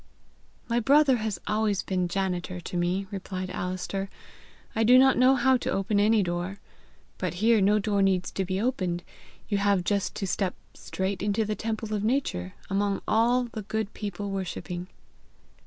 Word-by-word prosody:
"My 235 0 +1
brother 275 +2 +5
has 215 -5 -3
always 210 -1 0
been 180 -2 -1
janitor 180 -1 -2
to 175 - -7
me," 175 +3 0
replied 185 -1 -5
Alister; 185 +2 -3 0.7
"I 225 - +2
do 245 +3 +7
not 265 0 +6
know 255 +2 +5
how 260 0 +4
to - - -4
open 200 +1 +1
any 215 0 +4
door. 175 +2 -3 0.6
But 180 -2 -2
here 220 +3 +3
no 205 +2 +4
door 205 -1 +1
needs 190 -2 +1
to 195 - -1
be 185 +1 -2
opened; 185 -7 -1 0.4
you 205 -2 0
have 200 -2 +2
just 200 +1 -1
to 200 - -3
step 190 0 -1 0.2
straight 190 0 -3
into 205 +2 +1
the 215 - -1
temple 220 0 -3
of 205 -1 -1
nature, 215 - -1
among 200 0 0
all 240 +3 +3
the 230 -2 -6
good 220 +1 -3
people 205 -1 -5
worshipping." 180 -1 -4
200 Hz, 170 wpm, -27 LUFS, 185-220 Hz, 0.7 s, do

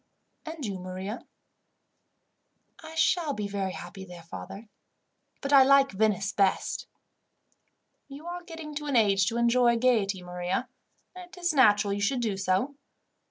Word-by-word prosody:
"And 320 -4 -6
you, 195 -3 -4
Maria?" 185 +5 -6 1.5
"I 320 0 -10
shall 320 -1 +2
be 210 -5 -3
very 195 -2 -3
happy 195 -2 -9
there, 175 -2 -11
father, 170 - -9 0.7
but 280 +1 -2
I 275 - +9
like 275 +1 +5
Venice 200 0 +1
best." 195 -2 0 1.2
"You 285 +3 -11
are 350 +1 -5
getting 325 -3 -9
to 295 0 -5
an 280 - -1
age 200 -4 +4
to 235 - -1
enjoy 235 0 +3
gaiety, 215 -6 +1
Maria; 180 +8 -3 0.5
and 365 -1 -10
it 370 0 -13
is 345 -2 0
natural 210 -7 +4
you 205 - -3
should 245 +5 0
do 215 -4 -1
so. 195 +9 -1
230 Hz, 150 wpm, -28 LUFS, 195-285 Hz, 1.5 s, I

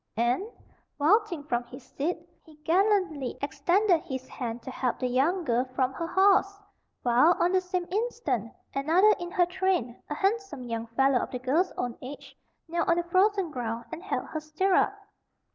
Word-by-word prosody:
And, 240 - +1 0.5
vaulting 345 +1 +2
from 245 -4 -1
his 255 +3 -12
seat, 320 +6 -3 0.3
he 315 - -17
gallantly 365 - +1
extended 335 +7 +2
his 260 -6 -6
hand 235 -2 -5
to 260 - -6
help 250 -1 -1
the - - -3
young 290 +9 +1
girl 245 -3 +1
from 260 -1 +1
her 335 +5 -4
horse; 390 +2 +3 0.5
while, 250 +8 +5
on 350 - +3
the 375 0 +3
same 365 -1 -2
instant, 465 +4 -1 0.2
another 335 +10 +4
in 350 0 -5
her 355 -1 +3
train, 360 -9 -1
a - - -2
handsome 395 - -1
young 230 -1 -4
fellow 265 +2 +2
of - - -3
the 250 - -4
girl's 285 +9 +1
own 245 -1 -3
age, 270 +3 -9 0.3
knelt 340 +1 -1
on 335 - +4
the 345 - +1
frozen 370 0 +2
ground 235 -3 -4
and 330 0 -6
held 390 - -3
her 310 - -3
stirrup. 310 +5 +2
320 Hz, 175 wpm, -28 LUFS, 255-375 Hz, 0.5 s, while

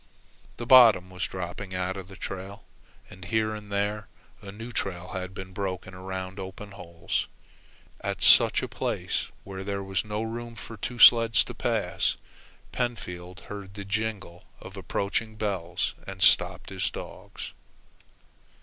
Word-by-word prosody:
The 120 - -5
bottom 115 -7 +8
was 90 -1 -2
dropping 95 +1 -5
out 90 +1 -1
of 95 -2 -7
the 95 - -12
trail, 95 +3 -6 0.5
and 95 - -11
here 110 +2 0
and 105 -1 -8
there 105 +1 -1 0.3
a 100 -1 -8
new 115 +4 -8
trail 90 -5 -3
had 95 0 -5
been 95 -1 -8
broken 95 -1 -4
around 95 +1 -6
open 95 +2 -7
holes. 85 -3 -3 0.7
At - - -2
such - - +7
a - - -1
place, - - -2 0.2
where 95 -1 -7
there 100 0 -3
was 95 -1 -1
not 105 0 -3
room 115 +1 -5
for 115 - -9
two 120 +3 -5
sleds 115 -1 +8
to - - -8
pass, - - 0 0.6
Pentfield 90 -8 -4
heard 100 0 -8
the 100 -1 -6
jingle 100 -4 -3
of - - -10
approaching 110 +2 -2
bells 95 -5 -2
and - - -7
stopped - - +5
his 95 -1 -1
dogs. - - -8
100 Hz, 150 wpm, -27 LUFS, 95-105 Hz, 0.7 s, bottom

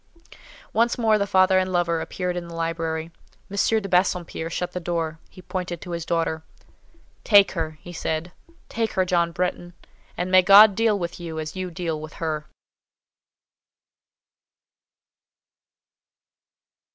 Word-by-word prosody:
Once 235 +1 +2
more 220 -3 +3
the 200 - 0
father 185 0 +4
and 185 0 -1
lover 170 -2 +1
appeared 180 +1 -3
in 175 -1 -5
the 170 - -9
library. 165 -1 -3 0.4
M. 215 +2 +1
de 200 - -5
Bassompierre 180 -3 0
shut 175 +1 -3
the 180 - -4
door; 165 -2 -3
he 185 - -15
pointed 180 -2 -4
to 180 - -9
his 170 -1 -4
daughter. 165 -1 -1 0.8
"Take 200 -2 +6
her," 160 -3 -4
he 175 - -10
said. 165 +1 -3 0.4
"Take 225 -1 -2
her, 185 - +1
John 170 -2 +1
Bretton: 175 0 -3 0.4
and 180 +1 -2
may 185 0 +7
God 200 +3 +8
deal 220 0 +2
with 175 -2 -5
you 165 -2 -6
as 155 +2 -6
you 185 -1 -4
deal 165 -2 -4
with 155 -1 -9
her!" 155 -2 -4
175 Hz, 140 wpm, -24 LUFS, 165-185 Hz, 0.8 s, God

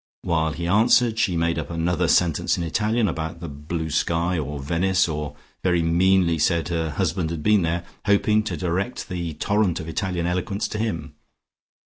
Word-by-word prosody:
While 80 -2 0
he 85 - -4
answered 110 +4 +3
she 90 -5 +1
made 85 0 +1
up 75 - -5
another 85 +1 0
sentence 85 -2 +2
in 85 - -2
Italian 110 +6 +1
about 80 -1 -4
the 85 - -6
blue 80 +2 -5
sky 85 +3 +1
or 75 -1 -4
Venice, 90 +6 +1
or 75 -2 -4 0.3
very 90 -2 +2
meanly 85 0 +3
said 85 +2 +1
her 80 -2 -1
husband 80 +3 -1
had 80 -2 -5
been 105 +1 +4
there, 85 +1 -1 0.2
hoping 105 +1 +3
to - - -3
direct 95 +7 -2
the 85 -4 -4
torrent 100 -3 +1
of 80 - -7
Italian 90 0 -2
eloquence 90 +3 -1
to 105 - -4
him. 80 -9 -3
85 Hz, 175 wpm, -23 LUFS, 80-95 Hz, 0.3 s, been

